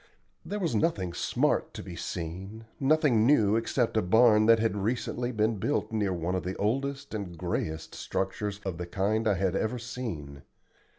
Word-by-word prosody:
There 205 Hz, -, -4 dB
was 170 Hz, -, -1 dB
nothing 100 Hz, -, 0 dB
smart -, -, 0 dB
to -, -, -6 dB
be -, -, -8 dB
seen, 95 Hz, +7 st, -6 dB
nothing 140 Hz, -5 st, +3 dB
new 110 Hz, -8 st, +4 dB
except 115 Hz, 0 st, 0 dB
a 110 Hz, -, +4 dB
barn 110 Hz, +2 st, +5 dB
that 115 Hz, 0 st, +7 dB
had 110 Hz, -1 st, 0 dB
recently 120 Hz, +3 st, -1 dB
been 110 Hz, -1 st, +1 dB
built 145 Hz, +7 st, -1 dB
near 105 Hz, -3 st, 0 dB
one 90 Hz, 0 st, -2 dB
of 95 Hz, -, 0 dB
the 95 Hz, +1 st, -4 dB
oldest 135 Hz, +6 st, -1 dB
and 95 Hz, -5 st, -5 dB
grayest 80 Hz, 0 st, -3 dB
structures 100 Hz, +1 st, -3 dB
of 90 Hz, -3 st, -3 dB
the 90 Hz, -, -4 dB
kind 105 Hz, +5 st, 0 dB
I 105 Hz, -, +3 dB
had 95 Hz, 0 st, 0 dB
ever 110 Hz, +5 st, 0 dB
seen. 100 Hz, -, -6 dB
110 Hz, 175 wpm, -29 LUFS, 95-120 Hz, -, that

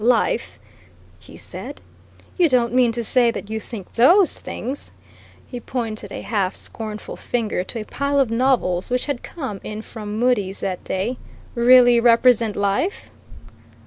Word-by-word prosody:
"Life!" 220 Hz, -, +1 dB, 0.6 s
he -, -, -14 dB
said. -, -, -9 dB, 0.6 s
"You 345 Hz, -3 st, +3 dB
don't 240 Hz, -3 st, +2 dB
mean 250 Hz, -2 st, +4 dB
to 235 Hz, 0 st, -2 dB
say 240 Hz, +1 st, +4 dB
that 215 Hz, -2 st, -5 dB
you 220 Hz, -, -2 dB
think 210 Hz, -3 st, -9 dB
those 340 Hz, -, +5 dB
things" 265 Hz, +5 st, -6 dB, 0.6 s
he 245 Hz, -, -7 dB
pointed 225 Hz, -5 st, -5 dB
a -, -, -6 dB
half 200 Hz, -3 st, -1 dB
scornful 215 Hz, -2 st, -6 dB
finger 220 Hz, -6 st, -2 dB
to 225 Hz, +3 st, -4 dB
a -, -, -8 dB
pile 280 Hz, +3 st, -1 dB
of 260 Hz, -5 st, +2 dB
novels 230 Hz, -8 st, +1 dB
which 250 Hz, 0 st, 0 dB
had 285 Hz, -4 st, -3 dB
come 260 Hz, -, -6 dB
in 215 Hz, +1 st, -6 dB
from 210 Hz, -2 st, -7 dB
Mudie's 210 Hz, -6 st, +1 dB
that 185 Hz, -2 st, -3 dB
day 210 Hz, +7 st, -3 dB, 0.3 s
"really 245 Hz, 0 st, +6 dB
represent 235 Hz, -2 st, +4 dB
life?" 200 Hz, -, -1 dB
235 Hz, 150 wpm, -21 LUFS, 210-250 Hz, 0.6 s, really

